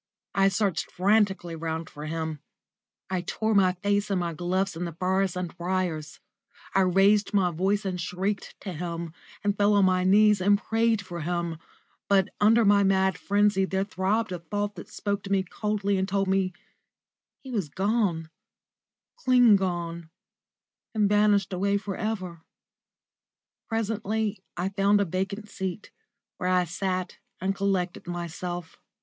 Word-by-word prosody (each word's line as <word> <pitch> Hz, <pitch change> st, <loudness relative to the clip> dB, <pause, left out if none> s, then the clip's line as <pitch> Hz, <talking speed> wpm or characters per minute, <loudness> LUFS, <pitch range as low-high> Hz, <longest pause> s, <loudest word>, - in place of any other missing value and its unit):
I 195 Hz, 0 st, +4 dB
searched 195 Hz, -2 st, 0 dB
frantically 190 Hz, -3 st, +1 dB
round 160 Hz, 0 st, -4 dB
for 150 Hz, +1 st, -8 dB
him; 160 Hz, -1 st, -3 dB, 0.7 s
I 185 Hz, -1 st, 0 dB
tore 220 Hz, +5 st, -1 dB
my 190 Hz, -3 st, +4 dB
face 205 Hz, +3 st, 0 dB
and 195 Hz, -2 st, +1 dB
my 170 Hz, -1 st, -2 dB
gloves 180 Hz, +3 st, -1 dB
in 175 Hz, +2 st, -3 dB
the 170 Hz, -, -5 dB
furze 185 Hz, +2 st, 0 dB
and 180 Hz, -2 st, -4 dB
briars; 175 Hz, -4 st, -2 dB, 0.5 s
I -, -, +3 dB
raised 195 Hz, +3 st, +3 dB
my 185 Hz, -3 st, +3 dB
voice 195 Hz, +5 st, 0 dB
and 180 Hz, -2 st, -2 dB
shrieked 190 Hz, +4 st, -3 dB
to 190 Hz, -, -5 dB
him, 170 Hz, 0 st, -5 dB, 0.3 s
and 205 Hz, -1 st, +1 dB
fell 205 Hz, 0 st, +3 dB
on 200 Hz, -1 st, +5 dB
my 185 Hz, -1 st, +2 dB
knees 205 Hz, +1 st, +5 dB
and 205 Hz, +2 st, +4 dB
prayed 225 Hz, -1 st, +1 dB
for 175 Hz, -2 st, -6 dB
him; 170 Hz, 0 st, -2 dB, 0.5 s
but 195 Hz, -2 st, +3 dB
under 225 Hz, +2 st, +5 dB
my 200 Hz, 0 st, +5 dB
mad 190 Hz, -1 st, +3 dB
frenzy 205 Hz, -1 st, +2 dB
there 190 Hz, 0 st, 0 dB
throbbed 200 Hz, +2 st, -1 dB
a 180 Hz, -, -3 dB
thought 205 Hz, +5 st, -3 dB
that -, -, -10 dB
spoke 200 Hz, -1 st, -2 dB
to 200 Hz, -, -6 dB
me 195 Hz, -1 st, +3 dB
coldly 205 Hz, -1 st, -1 dB
and 190 Hz, +1 st, -1 dB
told 195 Hz, 0 st, +1 dB
me 190 Hz, -1 st, +1 dB, 0.9 s
he 265 Hz, -, -8 dB
was 200 Hz, -10 st, -2 dB
gone 190 Hz, -4 st, 0 dB, 0.9 s
clean 250 Hz, -, +5 dB
gone, 170 Hz, -3 st, -2 dB, 0.9 s
and 210 Hz, -2 st, +3 dB
vanished 205 Hz, -2 st, +3 dB
away 200 Hz, +2 st, +1 dB
for 200 Hz, -1 st, -5 dB
ever. 185 Hz, -6 st, -4 dB, 1.3 s
Presently 220 Hz, -2 st, -1 dB, 0.2 s
I 180 Hz, +2 st, -1 dB
found 200 Hz, +1 st, +3 dB
a 200 Hz, -, +2 dB
vacant 195 Hz, +4 st, -3 dB
seat, 190 Hz, 0 st, -5 dB, 0.5 s
where 180 Hz, -, -1 dB
I 180 Hz, -1 st, +3 dB
sat 185 Hz, +1 st, -3 dB, 0.2 s
and 190 Hz, +2 st, 0 dB
collected 195 Hz, -3 st, -1 dB
myself. 175 Hz, 0 st, -5 dB
190 Hz, 155 wpm, -27 LUFS, 175-205 Hz, 1.3 s, on